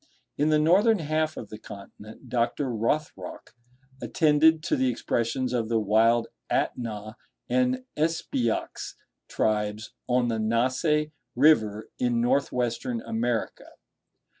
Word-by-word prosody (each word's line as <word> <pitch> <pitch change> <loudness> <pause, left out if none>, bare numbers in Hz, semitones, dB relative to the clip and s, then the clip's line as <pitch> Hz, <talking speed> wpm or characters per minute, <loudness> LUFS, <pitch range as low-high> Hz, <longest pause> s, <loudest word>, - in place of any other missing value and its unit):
In 150 +2 +1
the 155 - +4
northern 195 +9 +4
half 155 -1 -1
of 110 - -7
the 105 - -9
continent 105 +1 -12
Dr. 125 +2 0
Rothrock 130 +8 -3 0.5
attended 155 +5 +3
to - - +1
the 130 -1 +1
expressions 120 +1 -1
of 115 -3 -1
the 115 - +2
wild 110 +2 +3 0.3
Atnah 110 -2 -2 0.3
and 255 0 +1
Espyox 150 -7 -1 0.3
tribes 105 0 -1 0.2
on 125 0 +2
the 115 -1 -1
Nasse 130 +7 +1 0.2
River, 110 -7 +3
in 120 -1 +1
North 130 +4 +1
Western 120 -1 -2
America. 115 0 -2
120 Hz, 115 wpm, -26 LUFS, 110-150 Hz, 0.5 s, the